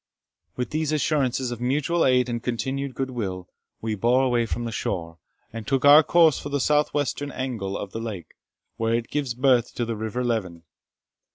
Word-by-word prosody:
With 125 - -3
these 155 -1 -1
assurances 135 -4 0
of 120 -1 -6
mutual 150 +7 +1
aid 125 -1 +3
and 120 -1 -3
continued 130 +2 -3
good 130 0 -3
will, 95 -7 -4 0.3
we 110 -1 -2
bore 120 +5 +2
away 120 -3 +1
from 120 +1 -3
the 115 - -3
shore, 85 -6 -4 0.3
and 115 -2 -7
took 135 0 +1
our 145 +2 +9
course 160 -1 +4
for 145 - -6
the 145 0 -1
south 150 +2 +2
western 145 0 -2
angle 115 -8 -3
of 100 - -6
the 115 - -5
lake, 105 -8 -6 0.4
where 115 0 +1
it 115 0 -3
gives 140 -5 -2
birth 125 -2 +2
to 120 - -1
the 115 0 -3
river 110 +3 -3
Leven. 95 -9 -2
125 Hz, 190 wpm, -24 LUFS, 115-140 Hz, 0.4 s, our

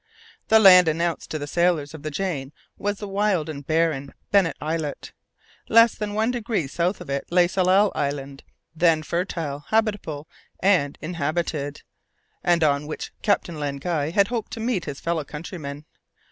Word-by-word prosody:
The 220 - +6
land 185 -4 +8
announced 165 +1 -1
to 155 - -3
the 145 - -4
sailors 165 -2 +1
of 160 - -9
the 155 - -4
Jane 150 -4 -3 0.2
was 205 0 -2
the 205 - -6
wild 195 -5 0
and 145 -2 -6
barren 155 -4 0 0.2
Bennet 190 -7 +3
Islet. 155 -2 -4 0.6
Less 230 +1 +6
than 210 -1 -4
one 220 +3 +1
degree 230 - -1
south 175 +7 -1
of - - -10
it 140 0 -2
lay 175 0 +4
Tsalal 190 +3 +3
Island, 140 -1 -3 0.3
then 165 -1 +3
fertile, 165 -4 -3
habitable 205 -9 -1 0.3
and 180 -8 +2
inhabited, 155 -2 -3 0.6
and 170 -2 +3
on 145 -1 +2
which 155 - -6
Captain 175 -6 0
Len 140 -1 -2
Guy 150 0 -1
had 200 +5 +2
hoped 235 -3 -3
to - - -5
meet 225 -5 -1
his 145 -2 -6
fellow 165 -2 -1
countrymen. 150 -1 -7
165 Hz, 160 wpm, -24 LUFS, 145-195 Hz, 0.6 s, land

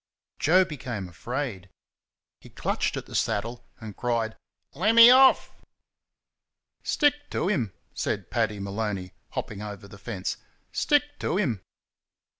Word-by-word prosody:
Joe 185 +4 +5
became 120 - -5
afraid. 105 - -5 0.7
He - - -15
clutched - - -1
at - - -5
the - - -13
saddle 115 +2 -1 0.2
and 110 -3 -8
cried, 115 -3 -1 0.4
"Let 210 +10 +2
me 230 +1 +11
off!" 265 +1 +6 1.3
"Stick 290 -1 +1
to 180 - -1
him!" 120 - 0 0.2
said - - -3
Paddy 110 -3 0
Maloney, 100 -2 -3 0.2
hopping 105 -2 -4
over 105 -2 -7
the 100 -1 -13
fence, 100 -5 -4 0.3
"Stick 290 -1 +3 0.2
to 180 - -1
him!" 125 - 0
115 Hz, 125 wpm, -26 LUFS, -, 1.3 s, me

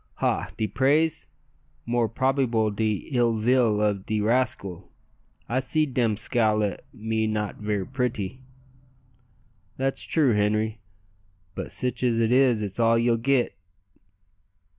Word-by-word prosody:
"Ha! - - -1
de 110 - 0
praise? 150 +7 +1 0.6
more 120 -1 +1
probeebale 115 -3 +1
de 110 -1 -1
ill 120 -3 +2
vill 115 -1 +2
of 105 -2 0
de 110 - 0
rascale. 105 -5 0 0.6
I 125 +2 0
seed 150 +1 0
dem 115 -4 +1
scowl 110 -1 +1
at 100 -3 -2
me 110 -1 -2
not 105 -1 -2
ver' 105 -2 -2
pritty." 125 -2 -3 1.4
"That's 135 +1 -1
true, 145 -7 +2
Henri; 105 +2 0 0.7
but - - -6
sich 125 -2 -2
as 120 -2 +2
it 115 0 +2
is 125 -4 +4
it's 100 +1 -5
all 115 0 +4
ye'll 115 0 +2
git." 130 +1 +1
115 Hz, 130 wpm, -25 LUFS, 105-125 Hz, 1.4 s, is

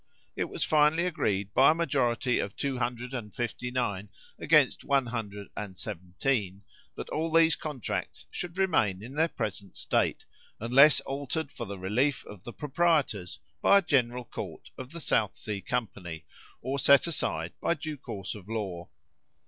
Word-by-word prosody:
It - - 0
was - - -2
finally 155 +2 +4
agreed, 105 - -1
by 135 - +7
a 155 - +4
majority 125 -6 +1
of 100 - -3
259 125 -4 -3 0.3
against - - +4
117, 105 -4 -2 0.3
that - - -6
all 160 +1 -1
these 165 0 +5
contracts 145 -7 -4
should 175 0 -6
remain 110 - +2
in 125 +4 -8
their 160 +3 +3
present 100 - -5
state, - - 0 0.3
unless 135 +6 +6
altered 140 +2 -3
for - - -6
the 100 0 -6
relief 120 +10 0
of 105 -4 -11
the 120 - -5
proprietors 150 - +1 0.2
by 200 - +7
a - - +5
general 125 -6 +1
court - - -7
of 130 0 -8
the 170 - -7
South 110 - +1
Sea 105 -2 -5
company, 90 -10 -4 0.4
or 135 +1 -1
set 140 0 +6
aside 85 - -1
by 170 - +2
due 155 -1 -5
course 100 -6 -6
of 105 -1 -11
law. 95 -6 -4
125 Hz, 140 wpm, -29 LUFS, 100-150 Hz, 0.4 s, by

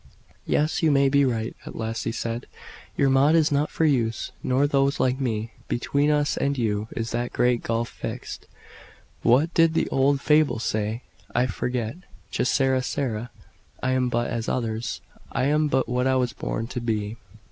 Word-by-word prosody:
"Yes, 155 +1 +1
you 160 - +4
may 140 -1 +4
be 140 +1 +4
right," 115 -3 -2
at - - -9
last 115 0 -3
he - - 0
said. 115 0 -4 0.5
"Your 140 - +3
Maud 140 +4 +5
is 160 -2 +3
not 145 +1 +1
for - - -1
me, 125 -7 +3 0.3
nor 130 +3 +2
those 140 0 +2
like 130 +1 +1
me. 110 -3 -2 0.2
Between 140 +4 +1
us 150 -1 +1
and 140 0 0
you 110 -3 -1
is 115 -1 -3
that 120 +1 -2
'great 125 -1 +2
gulf 115 0 -1
fixed;' - - -7 0.7
what 140 +8 +3
did 165 -1 +4
the - - +2
old 135 +1 +2
fable 150 -4 +3
say? 110 +1 -2 0.3
I 120 - +3
forget. 125 +2 -3 0.3
Che - - 0
sara 130 0 +2
sara! 120 -3 -2 0.5
I 130 - +1
am 130 -1 +1
but 120 0 -1
as 115 -1 -2
others: 115 -2 -2 0.3
I - - 0
am 150 +2 +2
but 130 -3 +1
what 125 +2 0
I 130 - +3
was 125 -3 +1
born 115 - -3
to 125 - -4
be." 110 -1 -2
125 Hz, 180 wpm, -25 LUFS, 115-140 Hz, 0.7 s, Maud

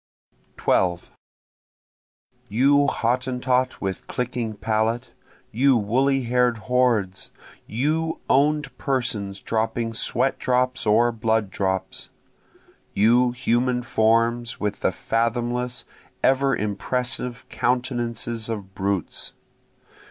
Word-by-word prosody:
12 - - +1 1.4
You 140 +6 +4
Hottentot 125 +1 0
with 95 -2 -4
clicking 120 -3 -3
palate! 110 +3 -1 0.4
you 130 +3 +4
woolly 130 +5 +1
hair'd 125 0 +2
hordes! 110 -5 0 0.4
You 155 +7 -1
own'd 145 -1 +2
persons 110 -7 -1
dropping 115 +1 -1
sweat 135 +3 +1
drops 125 -1 0
or 115 +3 +4
blood 110 -3 0
drops! 95 -1 -2 0.9
You 120 +4 +4
human 125 0 0
forms 115 +1 +1
with 105 -1 -2
the - - +1
fathomless 120 +4 -1 0.4
ever 135 0 +3
impressive 125 +4 -3
countenances 120 -2 -2
of 100 -4 -5
brutes! 95 -2 -2
120 Hz, 90 wpm, -23 LUFS, 110-125 Hz, 1.4 s, You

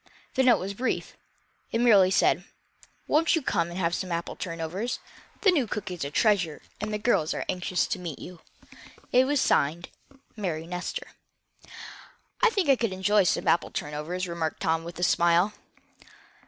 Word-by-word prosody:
The 265 - +2
note 255 -2 +5
was 195 +2 -4
brief. 250 +6 -2 0.6
It 230 - 0
merely 205 -6 +6
said: 190 - +3 0.6
"Won't 320 +3 +3
you 325 - -1
come, 170 -8 0
and 175 - -7
have 170 -2 0
some 185 0 -3
apple 170 0 -3
turnovers? 170 +7 -4 0.4
The 395 - +5
new 285 -9 +1
cook 205 -2 -4
is 175 -4 -4
a 140 - -3
treasure, 180 -2 +1 0.2
and 210 +1 -3
the 210 - -1
girls 210 -8 +1
are - - -3
anxious 180 0 0
to 190 - -3
meet 170 -6 -6
you." 180 -2 -10 0.7
It 255 +1 +5
was 290 0 +2
signed: 165 - +1 0.5
Mary 170 -7 -3
Nestor. 180 +1 -4 1.4
"I 485 - +6
think 395 -7 0
I 275 -2 +5
could 230 -5 -1
enjoy 195 +1 +3
some - - 0
apple 170 - +3
turnovers," 150 +5 -4
remarked 170 -2 -3
Tom, 165 -2 +1
with 170 +1 -8
a 175 - -3
smile. 175 +3 +3
185 Hz, 170 wpm, -27 LUFS, 170-220 Hz, 1.4 s, merely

